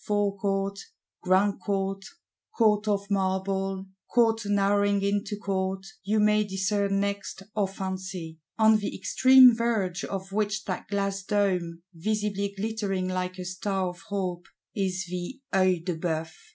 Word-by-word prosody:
Forecourt, 200 -1 0 0.4
Grand 190 +2 +2
Court, 195 -1 -2 0.5
Court 215 -2 +3
of 200 -1 -1
Marble, 190 0 -1 0.3
Court 225 -2 +3
narrowing 200 0 +2
into 205 +1 -1
Court 190 -1 -2 0.2
you 215 +2 +1
may 210 0 +4
discern 195 0 0
next, 200 -1 -3
or 205 -2 +2
fancy: 190 -4 -5 0.2
on 220 -1 +6
the 205 - -4
extreme 260 -1 +7
verge 210 -7 -1
of 195 0 -5
which 210 +1 -1
that 185 - -4
glass 195 -1 -1
dome, 180 -4 0
visibly 200 +2 -1
glittering 200 -3 -2
like 185 0 -2
a 180 - -6
star 185 0 -2
of 180 0 -10
hope, 185 -3 -3 0.3
is 190 -2 -1
the—Œil 185 -2 -1
de 180 -3 -1
Bœuf! 160 -1 -2
195 Hz, 130 wpm, -27 LUFS, 185-205 Hz, 0.5 s, extreme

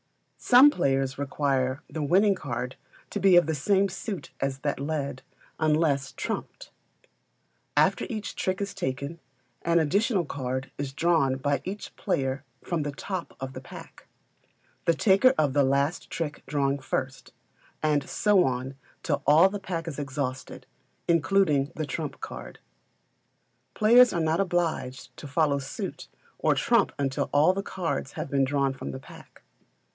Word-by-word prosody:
Some 260 +4 +7
players 135 - 0
require 135 -2 0
the 155 +1 -5
winning 190 +8 +4
card 125 -7 -4 0.4
to - - -2
be 195 -2 +5
of 175 - +6
the 160 - -1
same 195 +7 +2
suit 195 -3 -6
as 135 0 -2
that 145 -2 -1
led, 140 -2 -3 0.4
unless 150 -3 +2
trumped. - - -5 1.1
After - - +3
each 215 -4 -5
trick 185 0 -1
is 200 0 -3
taken, 140 -2 -4 0.4
an 170 0 +2
additional 195 - +2
card 130 -1 -4
is 140 -2 -3
drawn 150 -3 +2
by 140 +1 0
each 200 +3 -6
player 135 -7 -1 0.2
from 170 -3 -1
the 145 0 -2
top 185 +5 -6
of 135 0 -5
the - - -7
pack - - -12 0.8
the 170 - +3
taker 205 +9 +4
of 145 -4 +2
the 145 0 +4
last 140 +4 0
trick 150 -3 -4
drawing 140 0 0
first, 130 0 -4 0.5
and 150 -2 +1
so 205 -3 +3
on 130 -1 -2 0.3
till 145 -3 0
all 160 +5 +7
the 205 +1 -5
pack 175 -4 -4
is 150 -3 -5
exhausted, 130 -2 -4 0.4
including 165 -4 +2
the 155 - -2
trump 150 -1 -5
card. 65 0 -8 1.2
Players 240 +3 +6
are 175 - -1
not 160 0 +1
obliged 170 -9 -2
to 145 - -8
follow 140 0 +1
suit 135 - -6 0.3
or - - +2
trump - - +3
until 135 -1 -1
all 150 +6 +5
the 195 - -2
cards 165 -9 -3
have - - -5
been 140 -1 +3
drawn 135 0 +1
from 70 - -7
the 65 -1 -6
pack. - - -15
145 Hz, 150 wpm, -27 LUFS, 135-180 Hz, 1.2 s, Some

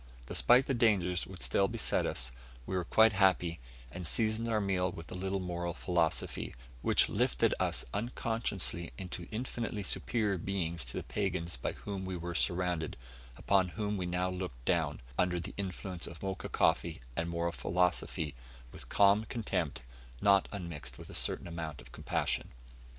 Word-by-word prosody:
Despite 125 - +4
the 135 - 0
dangers 100 -7 +2
which 95 -3 -7
still 100 - +3
beset 115 0 +1
us, 60 +1 0 0.3
we 95 - -3
were 90 - +1
quite 110 +6 +5
happy, 95 -3 +3 0.3
and 90 -2 -4
seasoned 110 +5 +2
our 110 -1 +2
meal 95 -2 +1
with 80 -2 -9
a - - -4
little 95 +1 -1
moral 90 -1 -3
philosophy, 85 -8 0 0.3
which - - +5
lifted - - +2
us - - +1
unconsciously 110 -6 -1
into 90 -2 -6
infinitely 115 -2 -3
superior 105 -1 0
beings 85 -4 -1
to - - -6
the - - -2
pagans 90 -5 -1
by - - -3
whom 100 -2 -5
we 95 -1 -3
were 85 +1 -4
surrounded 90 -2 0 0.4
upon 95 -2 +3
whom 105 -1 0
we 90 -3 -2
now 90 +1 0
looked 90 -10 -5
down, 80 -5 +1 0.2
under 90 -1 +2
the 90 +3 -6
influence 95 -2 -4
of 85 +2 -9
Mocha 95 -2 -3
coffee - - +2
and 85 +1 -1
moral 85 0 0
philosophy, 85 -4 0 0.4
with - - -12
calm 100 +2 +5
contempt, 110 - -2 0.4
not 100 -1 +5
unmixed 80 - -6
with - - -10
a - - -9
certain - - +1
amount 80 -4 -5
of - - -13
compassion. - - -1
90 Hz, 160 wpm, -33 LUFS, 85-100 Hz, 0.4 s, quite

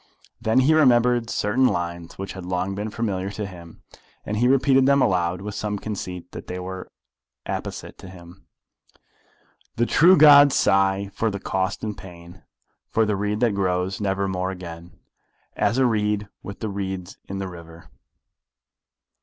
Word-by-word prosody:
Then 115 +2 +3
he 145 +5 +4
remembered 120 -5 +3
certain 125 +6 +2
lines 85 -3 -4
which 95 0 -6
had 95 - -8
long 90 +2 -2
been 105 +2 -4
familiar 100 -4 -3
to 105 +1 -5
him, 85 -3 -12 0.4
and 105 - -3
he 120 +3 +3
repeated 135 0 +4
them 140 0 +4
aloud, 90 -5 +1
with 105 +1 -6
some 105 0 -3
conceit 95 -4 -6
that - - -9
they 90 - -5
were 95 0 -7 0.5
apposite - - -6
to 95 - -11
him: 90 0 -15 1.3
The 120 - +1
true 175 +9 +5
gods 145 -2 +8
sigh 95 0 +2
for 115 +2 0
the 100 -1 -4
cost 95 +1 -2
and 105 -2 -3
pain, 85 -1 -13 0.5
For 110 - +2
the 105 -1 0
reed 105 +2 -2
that 120 -4 +3
grows 95 0 -1
never 100 -1 0
more 95 -1 -2
again 85 -2 -9 0.6
As 105 +3 +1
a 130 - +4
reed 105 -3 0
with 100 - -9
the 110 - -2
reeds 95 -2 -5
in 95 - -4
the 95 0 -4
river. 85 -2 -12
100 Hz, 160 wpm, -23 LUFS, 90-110 Hz, 1.3 s, gods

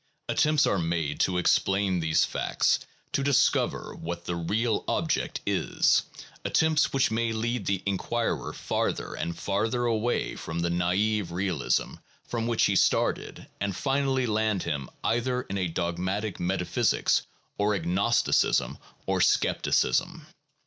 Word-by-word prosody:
Attempts 150 -1 +3
are 100 - +1
made 80 -3 -1
to 90 -1 +2
explain 95 +1 +2
these 80 -1 +2
facts, - - +1 0.3
to - - 0
discover 140 -1 +1
what 85 0 -6
the 85 - -2
real 105 +7 0
object - - -1
is, - - +2 0.4
attempts 160 -1 +2
which 135 -3 +2
may 115 +1 0
lead 115 0 -2
the 100 -1 0
inquirer 100 +4 -1
farther - - -2
and 85 - -4
farther 110 +5 -1
away 115 +1 0
from 80 +1 -4
the 85 0 0
naive 90 +2 0
realism 90 -4 -1 0.3
from 115 -1 -2
which 115 -2 +2
he - - +2
started - - +1
and 100 -2 -2
finally 135 0 0
land 110 -3 0
him 70 -5 -3
either 125 +2 0
in 100 - -5
a 90 - 0
dogmatic 90 +5 -2
metaphysics 90 0 +1 0.4
or 105 0 +2
agnosticism 95 +6 +1 0.3
or - - 0
scepticism. - - +1
100 Hz, 130 wpm, -27 LUFS, 85-115 Hz, 0.4 s, Attempts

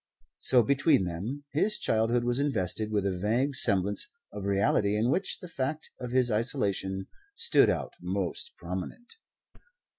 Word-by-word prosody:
So 125 -2 +5
between 140 - +3
them 100 +12 -4
his 210 +8 +2
childhood 115 +2 +1
was 120 +2 0
invested 110 -6 -1
with 105 -2 0
a 95 -2 0
vague 120 +9 0
semblance 100 -5 +1 0.3
of 100 - -6
reality 100 +1 +2
in 115 +4 +2
which 190 +5 0
the 180 - -10
fact 150 0 -4
of 125 - -5
his 125 -1 +2
isolation 100 -5 -1 0.3
stood 465 +1 +4
out - - -2
most 90 0 -3
prominent. 95 - -7
110 Hz, 145 wpm, -29 LUFS, 100-135 Hz, 0.3 s, So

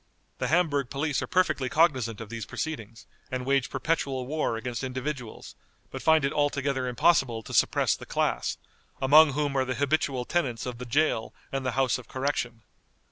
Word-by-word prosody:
The - - 0
Hamburg 150 -6 +1
police 140 0 -1
are - - -3
perfectly 155 -8 +1
cognizant 130 -9 +2
of 115 -2 -8
these 115 -2 -6
proceedings, 115 -8 -5 0.2
and 130 -1 -3
wage 135 -2 +1
perpetual 135 -5 -1
war 145 -4 -1
against 120 +2 -4
individuals, 130 -2 -5 0.4
but - - -6
find 160 -3 +4
it 140 - -1
altogether 140 -3 0
impossible 125 -3 +2
to - - -9
suppress - - +3
the - - -11
class, - - -1 0.4
among 145 +2 +6
whom 145 0 -1
are 135 - +3
the 130 0 -3
habitual 140 -3 0
tenants 125 -10 -1
of 125 -2 -5
the 125 - -6
jail 130 -3 +1 0.2
and 135 -1 -2
the 130 -2 -1
House 130 -3 +2
of 120 - -13
Correction. 125 -4 -2
135 Hz, 175 wpm, -27 LUFS, 125-150 Hz, 0.4 s, among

